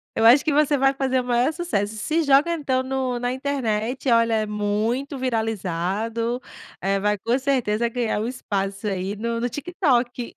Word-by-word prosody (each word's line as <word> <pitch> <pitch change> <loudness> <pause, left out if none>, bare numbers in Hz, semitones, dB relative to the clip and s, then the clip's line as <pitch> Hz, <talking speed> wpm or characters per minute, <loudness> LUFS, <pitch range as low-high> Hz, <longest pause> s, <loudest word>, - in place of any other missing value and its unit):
Eu 225 - +2
acho 250 +5 +7
que 310 - +1
você 295 0 +3
vai 270 +1 +3
fazer 260 -1 0
o - - -7
maior 245 +5 +1
sucesso. 220 - -2
Se 315 +9 0
joga 285 +4 +4
então 265 -5 0
no 260 -2 -2
na 245 0 -1
internet, 260 -2 -2
olha, 230 -1 +4
é 215 -1 +1
muito 215 +7 -1
viralizado, 225 0 -2 0.4
eh, 195 +1 +1
vai 210 +1 +1
com 235 +6 0
certeza 240 -4 +1
ganhar 230 -3 -1
um 220 - -2
espaço, 200 -5 -3
aí, 195 +1 -2
no 230 +2 -2
no 245 - 0
TikTok. 255 - -1
240 Hz, 175 wpm, -23 LUFS, 215-270 Hz, 0.4 s, acho